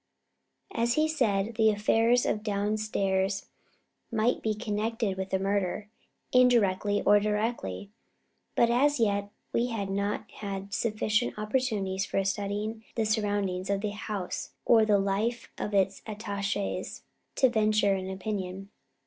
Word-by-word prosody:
As 235 Hz, +1 st, +1 dB
he 310 Hz, 0 st, +3 dB
said, 225 Hz, -8 st, +1 dB
the 220 Hz, -1 st, +5 dB
affair 220 Hz, +2 st, +2 dB, 0.2 s
of 210 Hz, -, 0 dB
downstairs 200 Hz, -2 st, 0 dB, 0.7 s
might 230 Hz, +2 st, +1 dB
be 215 Hz, -1 st, 0 dB
connected 215 Hz, -1 st, -1 dB
with 190 Hz, 0 st, -4 dB
the 190 Hz, -, +1 dB
murder, 200 Hz, +1 st, -1 dB, 0.4 s
indirectly 210 Hz, -5 st, +3 dB
or 205 Hz, -, +6 dB
directly, 210 Hz, -, -2 dB, 0.6 s
but 235 Hz, 0 st, +4 dB
as 285 Hz, +3 st, +3 dB
yet 200 Hz, -2 st, +1 dB, 0.2 s
we 240 Hz, -, +2 dB
had 205 Hz, -5 st, -3 dB
not 200 Hz, +1 st, -2 dB
had 200 Hz, -1 st, -6 dB
sufficient 215 Hz, +1 st, 0 dB
opportunities 215 Hz, -4 st, -1 dB
for 195 Hz, -, 0 dB
studying 205 Hz, +3 st, -2 dB
the 225 Hz, -, +1 dB
surroundings 205 Hz, -4 st, 0 dB
of 200 Hz, 0 st, +1 dB
the 210 Hz, -1 st, -1 dB
house 205 Hz, -3 st, -5 dB
or 225 Hz, -2 st, +6 dB
the 210 Hz, -1 st, +4 dB
life 200 Hz, +5 st, -1 dB
of 210 Hz, -, -2 dB
its 195 Hz, -1 st, +1 dB
attachés 205 Hz, -2 st, -3 dB, 0.3 s
to 260 Hz, -, +5 dB
venture 215 Hz, -3 st, +3 dB
an 190 Hz, -1 st, -3 dB
opinion. 190 Hz, 0 st, -4 dB
210 Hz, 130 wpm, -29 LUFS, 195-225 Hz, 0.7 s, or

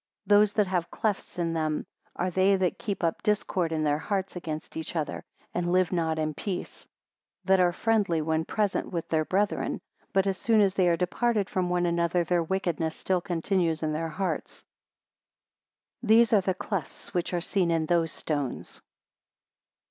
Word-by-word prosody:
65 -, -, -23 dB
Those 205 Hz, 0 st, +6 dB
that 210 Hz, -, +3 dB
have 180 Hz, -3 st, -1 dB
clefts 210 Hz, -3 st, -2 dB
in 170 Hz, -1 st, 0 dB
them, 155 Hz, -2 st, -1 dB, 0.3 s
are 180 Hz, 0 st, -1 dB
they 190 Hz, +2 st, +4 dB
that 185 Hz, -2 st, 0 dB
keep 200 Hz, -4 st, -3 dB
up 165 Hz, -1 st, 0 dB
discord 195 Hz, -5 st, 0 dB
in 155 Hz, -1 st, 0 dB
their 150 Hz, 0 st, +1 dB
hearts 195 Hz, +1 st, -2 dB
against 155 Hz, -3 st, -6 dB
each 160 Hz, +1 st, -5 dB
other, 155 Hz, -3 st, -2 dB, 0.3 s
and 175 Hz, 0 st, -1 dB
live 185 Hz, -1 st, +3 dB
not 165 Hz, -3 st, 0 dB
in 155 Hz, -1 st, -1 dB
peace; 185 Hz, +4 st, -5 dB, 0.6 s
that 190 Hz, 0 st, +4 dB
are 180 Hz, -1 st, +4 dB
friendly 205 Hz, -4 st, +1 dB
when 160 Hz, +1 st, 0 dB
present 205 Hz, +2 st, -1 dB
with 170 Hz, -3 st, -3 dB
their 160 Hz, -1 st, +2 dB
brethren, 200 Hz, +4 st, 0 dB, 0.3 s
but 195 Hz, 0 st, +2 dB
as 195 Hz, -2 st, -1 dB
soon 225 Hz, -2 st, +3 dB
as 195 Hz, -2 st, +4 dB
they 185 Hz, -2 st, +3 dB
are 170 Hz, -1 st, +3 dB
departed 210 Hz, +3 st, 0 dB
from 180 Hz, -1 st, 0 dB
one 175 Hz, 0 st, +1 dB
another, 170 Hz, 0 st, +1 dB
their 175 Hz, +1 st, +1 dB
wickedness 165 Hz, -2 st, -1 dB
still 185 Hz, -2 st, 0 dB
continues 170 Hz, -2 st, 0 dB
in 155 Hz, -1 st, 0 dB
their 165 Hz, +1 st, -2 dB
hearts: 185 Hz, +4 st, -3 dB, 1.4 s
these 225 Hz, 0 st, +5 dB
are 205 Hz, -, +6 dB
the 185 Hz, 0 st, -1 dB
clefts 190 Hz, -5 st, -5 dB
which 175 Hz, -1 st, -1 dB
are 175 Hz, -, 0 dB
seen 180 Hz, 0 st, 0 dB
in 165 Hz, -1 st, +1 dB
those 165 Hz, -1 st, +1 dB
stones. 145 Hz, -5 st, -4 dB
180 Hz, 180 wpm, -27 LUFS, 165-195 Hz, 1.4 s, Those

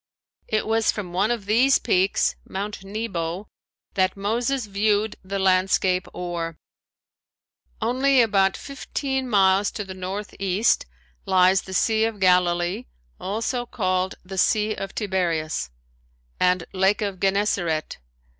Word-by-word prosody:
It 215 Hz, -, 0 dB
was 225 Hz, 0 st, +2 dB
from 185 Hz, -5 st, -6 dB
one 195 Hz, +4 st, +2 dB
of 235 Hz, -4 st, -2 dB
these 245 Hz, +6 st, +4 dB
peaks, 190 Hz, +2 st, +1 dB
Mount 200 Hz, +1 st, -5 dB
Nebo, 195 Hz, -3 st, -4 dB, 0.5 s
that 185 Hz, 0 st, +1 dB
Moses 235 Hz, +5 st, -1 dB
viewed 205 Hz, +1 st, 0 dB
the 195 Hz, +1 st, -4 dB
landscape 185 Hz, -1 st, +2 dB
o'er. 170 Hz, -2 st, -4 dB, 1.3 s
Only 260 Hz, +3 st, +3 dB
about 195 Hz, -4 st, +3 dB
fifteen 265 Hz, -1 st, -4 dB
miles 195 Hz, -1 st, +4 dB
to 210 Hz, -, -4 dB
the 190 Hz, -1 st, -8 dB
northeast 195 Hz, -, -1 dB, 0.4 s
lies 185 Hz, +1 st, +4 dB
the 190 Hz, -, -7 dB
Sea 220 Hz, +3 st, +2 dB
of 225 Hz, -2 st, -3 dB
Galilee, 180 Hz, -1 st, +2 dB, 0.3 s
also 230 Hz, +5 st, -2 dB
called 185 Hz, -6 st, -1 dB
the 190 Hz, 0 st, -4 dB
Sea 215 Hz, +3 st, +2 dB
of 195 Hz, -2 st, -6 dB
Tiberias 170 Hz, -, -1 dB, 0.7 s
and 180 Hz, -1 st, +2 dB
Lake 190 Hz, +3 st, +2 dB
of 200 Hz, -3 st, -3 dB
Gennesaret. 190 Hz, -5 st, 0 dB
195 Hz, 120 wpm, -24 LUFS, 185-220 Hz, 1.3 s, these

